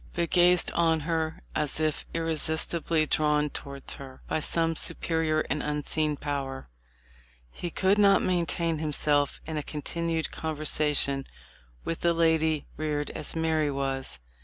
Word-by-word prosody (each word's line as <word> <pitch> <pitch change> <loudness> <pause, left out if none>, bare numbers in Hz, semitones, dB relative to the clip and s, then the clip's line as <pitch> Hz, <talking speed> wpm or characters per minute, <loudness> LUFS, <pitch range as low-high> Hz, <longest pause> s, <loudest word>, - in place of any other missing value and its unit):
but 170 -1 -1
gazed 180 0 +5
on 165 -2 +2
her 160 0 -2
as 150 0 -1
if 155 -1 0
irresistibly 160 0 0
drawn 150 -1 +2
towards 140 -1 -5
her 135 -1 -10
by - - 0
some 165 +2 +1
superior 160 -1 0
and 150 - -2
unseen 150 0 -1
power. 140 -2 -4 0.8
He 175 - -5
could 190 +4 +2
not 200 -1 +5
maintain 170 -2 0
himself 145 -2 +1
in 160 -1 -4
a - - 0
continued 160 +2 -3
conversation 150 -3 +1 0.6
with 165 - -3
a 170 0 +4
lady 160 -2 +2
reared 150 -1 -2
as 150 - -4
Mary 160 -2 +1
was. 135 - -3
155 Hz, 135 wpm, -28 LUFS, 150-165 Hz, 0.8 s, gazed